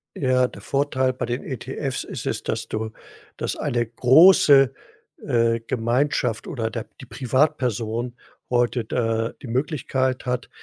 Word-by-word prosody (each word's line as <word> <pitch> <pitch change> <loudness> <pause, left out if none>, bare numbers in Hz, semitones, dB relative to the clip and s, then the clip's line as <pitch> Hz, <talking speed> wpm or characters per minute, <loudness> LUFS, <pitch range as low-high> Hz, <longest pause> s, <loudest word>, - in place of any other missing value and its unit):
Ja, 130 -2 +2
der - - -12
Vorteil 130 -2 0
bei 125 - -3
den 120 +2 -3
ETFs 130 +1 -4
ist - - -7
es, - - -2
dass 110 0 -3
du 110 0 -3 0.5
dass - - -2
eine 120 -1 -1
große, 135 +2 +6 0.5
äh, 115 -1 +2
Gemeinschaft 120 0 0
oder 115 -4 -2
der 115 -1 -5
die - - -10
Privatperson 125 -3 -1 0.3
heute 120 0 +1
da 115 0 -1
die 135 - -8
Möglichkeit 130 0 -1
hat, 125 0 -2
125 Hz, 135 wpm, -23 LUFS, 115-130 Hz, 0.5 s, große